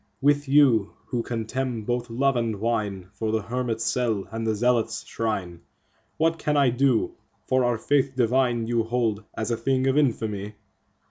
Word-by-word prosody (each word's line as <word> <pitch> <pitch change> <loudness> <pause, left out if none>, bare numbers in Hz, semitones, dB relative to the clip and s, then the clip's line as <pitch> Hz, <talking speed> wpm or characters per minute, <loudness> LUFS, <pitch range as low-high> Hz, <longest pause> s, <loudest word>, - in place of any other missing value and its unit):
With 145 +1 +2
you, 135 -8 +4 0.2
who 120 -3 -1
contemn 120 +1 -3
both 120 +2 -2
love 135 +4 +1
and 115 -2 0
wine2 100 -4 -2
for 110 +2 -2
the 110 -1 0
hermit's 115 -1 -2
cell 115 -6 0
and 115 0 -3
the 110 - +1
zealot's 120 +1 +1
shrine, 95 -7 -3 0.6
What 165 +1 +1
can 150 -1 0
I 140 -3 +4
do, 125 -1 +2 0.3
for 130 0 +2
our 120 -1 +1
Faith 135 +2 +1
divine 120 -1 +2
you 120 0 +1
hold 115 -2 -1
as 115 +1 -2
a 115 - 0
thing 130 +3 0
of 135 +2 +3
infamy? 105 -6 -1
120 Hz, 170 wpm, -25 LUFS, 110-130 Hz, 0.6 s, you